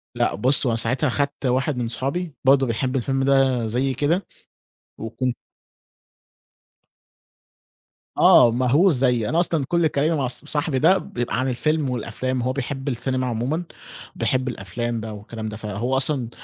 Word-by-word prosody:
لأ - - 0
بُصّ، 130 +6 +4
هو 120 - +2
أنا 115 - 0
ساعتها 130 +5 0
خدت 140 +1 -2
واحد 130 +2 0
من 120 -2 -2
صُحابي 140 +7 -3
برضه 135 -1 +4
بيحب 125 +3 -2
الفيلم 135 +1 0
ده 135 -4 +2
زيي 130 +4 -1
كده، 155 +9 0 0.7
وكُن 120 +2 -3 2.8
آه، 120 - +7
مهووس 135 +9 +3
زيي، 125 -4 +1
أنا 165 - +1
أصلًا 165 -5 +1
كل 170 -2 +2
كلامي 155 +3 0
مع 135 -4 -1
ص 130 - -2
صاحبي 145 -2 0
ده 185 +6 +5
بيبقى 120 -7 -3
عن 130 0 0
الفيلم 150 +2 0
والأفلام 125 +1 -3
هو 130 +1 -1
بيحب 135 +1 -5
السينما 130 +1 -2
عمومًا، 125 +9 -2 0.5
بيحب 130 0 -1
الأفلام 120 +3 -4
بقى 110 -1 -6
والكلام 110 +1 -7
ده، 105 - -7
فهو 115 +5 -2
أصلًا 130 -3 0
130 Hz, 155 wpm, -22 LUFS, 120-140 Hz, 2.8 s, آه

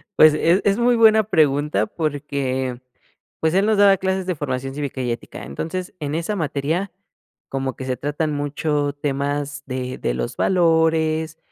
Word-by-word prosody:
Pues, 155 -1 +7
es 170 +5 +3
es 200 0 +3
muy 240 +1 +3
buena 220 -1 +6
pregunta 150 -6 +2
porque, 140 -6 -2 0.6
pues, 160 +1 +1
él 195 +2 +4
nos 220 -1 +2
daba 200 -1 +6
clases 190 0 -1
de 180 - 0
Formación 135 -2 -3
Cívica 140 -2 -4
y 125 -1 -1
Ética. 115 - -7
Entonces, 165 - -5
en 150 0 -3
esa 170 +6 -2
materia, 160 +3 -2 0.6
como 135 -1 -3
que 130 - -7
se 130 -1 -2
tratan 150 +2 -2
mucho 145 0 -1
temas 145 0 -2
de 130 0 -4
de - - -1
los - - -4
valores, 160 -2 +2
150 Hz, 160 wpm, -21 LUFS, 140-175 Hz, 0.6 s, Pues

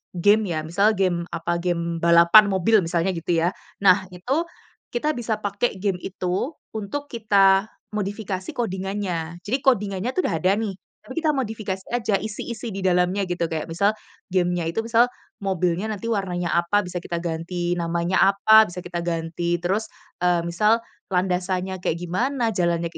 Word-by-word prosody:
game 205 +1 +3
ya, 155 - -2
misal 200 +7 +2
game 175 -3 0
apa, 170 +1 -1
game 170 -1 -1
balapan 170 +5 +7
mobil 195 +4 +4
misalnya, 170 +2 0
gitu 165 0 0
ya. 175 - +2 0.3
Nah, 190 0 +6
itu, 255 - -1 0.5
kita 300 +6 0
bisa 225 -3 -2
pakai 205 +1 -1
game 195 -2 0
itu 185 +6 -2 0.3
untuk 220 +8 -4
kita 200 -3 +3 0.3
modifikasi 200 -2 -3
coding-annya. 190 -5 -3
Jadi 245 +6 +1
coding-annya 205 -3 +1
itu - - -2
sudah 165 - -1
ada 190 +1 +4
nih. 210 -3 -2 0.3
Tapi 260 - -11
kita 310 - +4
modifikasi 215 -8 -3
saja, 220 -5 +1
isi-isi 225 +2 -5
di 195 - -4
dalamnya 180 +2 +2
gitu. 175 -1 -1
Kayak 160 0 -4
misal 200 +6 +2 0.4
game-nya 175 -2 +1
itu 195 +7 -1
misal, 230 +1 +4 0.3
mobilnya 185 0 0
nanti 230 +3 -5
warnanya 180 -5 -1
apa? 175 +4 +2
Bisa 180 0 -5
kita 170 0 -4
ganti 175 +1 -2
namanya 170 +2 0 0.2
apa, 220 +2 +6
bisa 175 +1 -7
kita 175 -1 -4
ganti. 170 0 -2
Terus, 210 +5 0 0.3
eee, 175 -1 +3
misal 210 +7 +2 0.3
landasannya 185 +1 -1
kayak 160 - 0
gimana, 230 +7 0
jalannya 170 -2 0
ke - - -11
190 Hz, 160 wpm, -23 LUFS, 175-215 Hz, 0.5 s, balapan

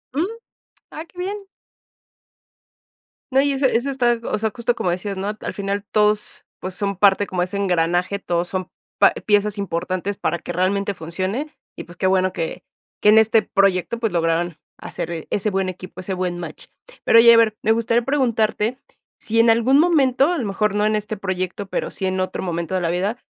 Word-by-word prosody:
Mm. 310 +5 +1 0.7
Ah, 315 - -7
qué 345 - -26
bien. 385 +3 -3 1.9
No, 265 +1 +4
y 285 0 +1
eso 270 0 +2
eso 250 +3 0
está, 240 -3 +1
o - - -2
sea, 220 0 -1
justo 240 0 0
como 180 - -1
decías, 185 +3 -2
¿no? 190 +1 -4
Al - - -5
final 200 0 -3
todos, 210 0 0
pues, 185 0 -5
son 200 0 -1
parte 200 0 +4
como 180 -1 -2
de - - +2
ese 185 +2 -4
engranaje, 180 0 +1
todos 175 -3 -2
son 185 -1 -4 0.3
pa - - +6
piezas 210 0 +1
importantes 185 +1 -3
para 170 +2 -1
que - - -6
realmente 200 +2 0
funcione, 185 - -4 0.2
y - - -7
pues, 175 0 -15
qué 190 - +1
bueno 185 0 +2
que 170 +1 -4 0.4
que - - +2
en 215 - +7
este 220 0 +4
proyecto, 195 +2 +1
pues, 225 -3 -1
lograran 165 0 0 0.2
hacer, - - -6
eh, 165 -2 -6
ese 210 +1 0
buen 190 -1 0
equipo, 185 0 -9
ese 190 +1 -4
buen 180 -1 -2
match. - - -8 0.4
Pero 230 - +7
oye, 235 0 +8
haber, 225 -2 +4
me 220 - +2
gustaría 230 +1 +2
preguntarte 235 -3 0 0.4
si 225 0 0
en 230 0 +5
algún 235 +5 +4
momento, 295 -2 +3
a 350 - -1
lo 250 - -2
mejor 205 0 0
no 210 0 +2
en 215 - +2
este 210 +1 -4
proyecto, 190 0 -4
pero, - - -3
sí 190 - -4
en 185 0 -1
otro 185 - -2
momento 170 0 -3
de 185 - 0
la 170 - 0
vida, 190 +7 -1
200 Hz, 200 wpm, -21 LUFS, 185-230 Hz, 1.9 s, oye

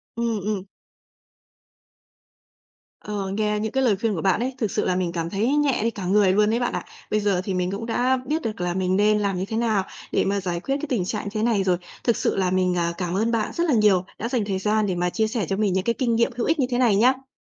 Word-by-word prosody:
Ừm, 230 -2 -1
ừm. 200 -1 -2 2.4
Ờ, 205 -2 -4
nghe 210 +1 0
những 220 0 -2
cái 265 0 +1
lời 220 -5 +3
khuyên 210 +1 -1
của 165 - -3
bạn 190 0 +2
ấy, 255 +2 -2
thực 220 -6 -1
sự - - 0
là 185 - +1
mình 180 -2 -1
cảm 165 -1 -3
thấy 205 +5 0
nhẹ 290 -3 +2
đi 230 - +1
cả 200 -5 -6
người 195 0 +4
luôn 210 +1 +3
đấy 230 +2 +1
bạn 245 - -1
ạ. - - -3 0.3
Bây 215 - +2
giờ 200 -3 +1
thì 195 - -3
mình 180 0 -1
cũng 200 +3 -4
đã 250 +3 +1
biết 310 +4 -1
được 215 -7 -4
là 175 0 -1
mình 185 0 0
nên 210 +1 +3
làm 200 -3 0
như 185 - -2
thế 220 +1 -3
nào 220 -5 +1 0.3
để - - +2
mà 200 +1 0
giải 175 -2 -2
quyết 270 +9 -2
cái 300 +1 -5
tình 210 -9 0
trạng 210 +2 -3
như 205 - -4
thế 215 0 -1
này 220 -4 +2
rồi. 185 -2 +2 0.3
Thực 235 - +2
sự - - 0
là 185 -2 +1
mình, 185 -1 +1
à, 170 0 0
cảm 180 -1 -2
ơn 225 +4 +1
bạn 225 -2 0
rất 340 - 0
là 295 - +2
nhiều, 205 -5 +4
đã 230 - -3
dành 245 -5 0
thời 190 -2 -2
gian 215 +1 +1
để 185 - -1
mà 180 0 0
chia 220 +4 0
sẻ 215 -4 -2
cho 195 - 0
mình 200 -3 +1
những 190 0 0
cái 235 - +1
kinh 240 -3 +1
nghiệm 235 +3 +2
hữu 240 - -1
ích 320 -1 +1
như 255 - +2
thế 245 - 0
này 240 -5 +4
nhá. 260 +5 +2
210 Hz, 285 wpm, -24 LUFS, 190-235 Hz, 2.4 s, người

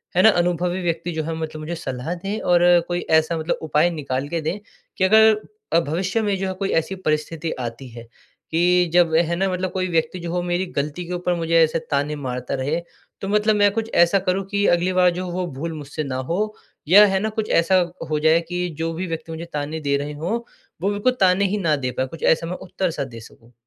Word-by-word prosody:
है 180 - +5
न 220 - +9
अनुभवी 180 0 0
व्यक्ति 170 0 -2
जो 160 -1 -2
है 165 - -3
मतलब 160 -1 -5
मुझे 165 +3 -4
सलाह 135 +1 -4
दें। 195 +5 -4
और 175 -1 +3 0.3
कोई 175 0 -1
ऐसा 160 +1 +3
मतलब 160 +1 -1
उपाय 155 +2 +2
निकाल 140 -4 -3
के 170 -1 -2
दें 165 +6 -2 0.4
कि - - +1
अगर 220 +3 +6 0.5
भविष्य 185 +8 -1
में 205 -2 0
जो 190 - -2
है 190 - -2
कोई 195 +1 -3
ऐसी 165 +4 -5
परिस्थिति 160 -1 -2
आती 120 +2 -5
है 115 0 -10 0.5
कि 175 +1 +3
जब 175 -2 +4
है 170 +1 +2
न 190 +3 0
मतलब 185 0 -2
कोई 185 0 -1
व्यक्ति 165 +2 0
जो 170 -1 -5
हो 180 - 0
मेरी 175 +1 -1
गलती 150 +5 -2
के 180 - -4
ऊपर 180 0 -1
मुझे 165 0 -1
ऐसे 160 +1 +1
ताने 145 +1 0
मारता 125 -3 -4
रहे। 145 +6 -1 0.4
तो 195 - -4
मतलब 210 +1 +2
मैं 205 -1 +4
कुछ 225 +2 -3
ऐसा 175 +3 +2
करूँ 190 +1 -1
कि 205 0 +1
अगली 180 +2 -1
बार 180 -1 +5
जो 180 +1 -4
वो 180 +1 -2
भूल 165 +3 -4
मुझसे 150 0 -5
न 135 -3 -5 0.2
हो 175 - 0 0.5
या 205 +5 +8
है 190 -1 +1
न - - -1
कुछ 215 - -2
ऐसा 180 +3 +2 0.3
हो 155 -1 0
जाए 160 +2 +4
कि 180 0 -1
जो 165 0 -1
भी 185 +3 -4
व्यक्ति 165 0 -5
मुझे 160 +1 -6
ताने 150 +2 -3
दे 140 -1 +1
रहे 145 +1 -4
हो 185 +11 -3 0.4
वो 195 - +1
मेरे 205 0 -3
को 255 - +5
ताने 185 +2 +3
ही - - 0
न 155 -2 +3
दे 130 - -1
पाएँ 130 - 0
कुछ 160 +4 -10
ऐसा 165 - -7
मैं 180 +2 -4
उत्तर-सा 180 -4 -2
दे 120 -4 -9
सकूँ। 115 +1 -17
170 Hz, 235 wpm, -22 LUFS, 155-185 Hz, 0.5 s, न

